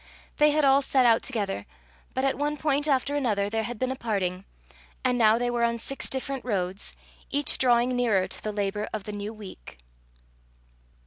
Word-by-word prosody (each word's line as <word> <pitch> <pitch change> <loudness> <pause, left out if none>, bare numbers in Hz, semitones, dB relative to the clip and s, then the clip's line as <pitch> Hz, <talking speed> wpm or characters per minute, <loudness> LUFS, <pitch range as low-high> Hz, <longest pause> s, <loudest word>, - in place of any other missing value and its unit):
They 300 0 +6
had 300 0 +3
all 275 +1 +5
set 265 -2 +2
out 230 -1 +5
together, 200 - -3 0.5
but 260 - +1
at 270 - +2
one 295 +1 -1
point 295 0 0
after 275 0 +1
another 210 -8 0
there 225 0 0
had 235 +1 -5
been 255 +3 -1
a - - -2
parting, 195 -6 -2 0.6
and 250 -1 +3
now 225 -2 +5
they 245 0 0
were 240 -1 0
on 235 0 +2
six 275 +4 -4
different 265 0 -3
roads, 195 -4 -2 0.3
each 285 +1 +1
drawing 245 0 +3
nearer 220 -7 +2
to - - -7
the 215 - -3
labour 205 0 -2
of 215 -2 -3
the 210 - -6
new 205 +1 -4
week. 200 - -11
235 Hz, 190 wpm, -27 LUFS, 210-270 Hz, 0.6 s, They